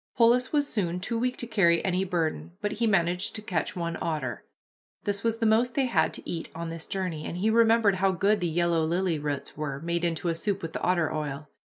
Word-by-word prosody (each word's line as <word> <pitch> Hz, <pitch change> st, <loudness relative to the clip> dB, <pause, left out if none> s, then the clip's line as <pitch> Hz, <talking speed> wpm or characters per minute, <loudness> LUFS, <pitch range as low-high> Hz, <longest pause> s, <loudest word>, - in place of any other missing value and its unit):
Polis 245 Hz, +1 st, +4 dB
was 290 Hz, -2 st, +2 dB
soon 180 Hz, -7 st, -1 dB
too 230 Hz, +5 st, -2 dB
weak 250 Hz, +1 st, -1 dB
to -, -, -2 dB
carry 190 Hz, -7 st, +3 dB
any 185 Hz, 0 st, +1 dB
burden, 170 Hz, -3 st, -2 dB
but 205 Hz, 0 st, -2 dB
he 230 Hz, +2 st, 0 dB
managed 180 Hz, -2 st, +1 dB
to 215 Hz, -, -2 dB
catch 180 Hz, -6 st, -2 dB
one 170 Hz, -2 st, -3 dB
otter. 145 Hz, -8 st, -3 dB, 0.6 s
This 200 Hz, 0 st, -1 dB
was 230 Hz, -1 st, +1 dB
the 225 Hz, -, 0 dB
most 235 Hz, +3 st, +3 dB
they 275 Hz, -, +3 dB
all 255 Hz, -, -1 dB
had -, -, +2 dB
to -, -, -9 dB
eat 165 Hz, -2 st, -4 dB
on 165 Hz, 0 st, -4 dB
this 165 Hz, -1 st, -7 dB
journey, 180 Hz, -5 st, -3 dB
and 170 Hz, -, -5 dB
he 215 Hz, +4 st, +2 dB
remembered 225 Hz, -3 st, +4 dB
how 195 Hz, +1 st, +3 dB
good 200 Hz, +4 st, +2 dB
the 175 Hz, -, 0 dB
yellow 170 Hz, 0 st, +1 dB
lily 170 Hz, 0 st, 0 dB
roots 145 Hz, -1 st, -4 dB
were, 140 Hz, -2 st, -4 dB
made 170 Hz, +1 st, -1 dB
into 170 Hz, 0 st, 0 dB
a -, -, +1 dB
soup 195 Hz, +3 st, -2 dB
with 165 Hz, 0 st, -5 dB
the -, -, -4 dB
otter 175 Hz, -3 st, +1 dB
oil. 150 Hz, -1 st, -4 dB
180 Hz, 235 wpm, -27 LUFS, 165-215 Hz, 0.6 s, Polis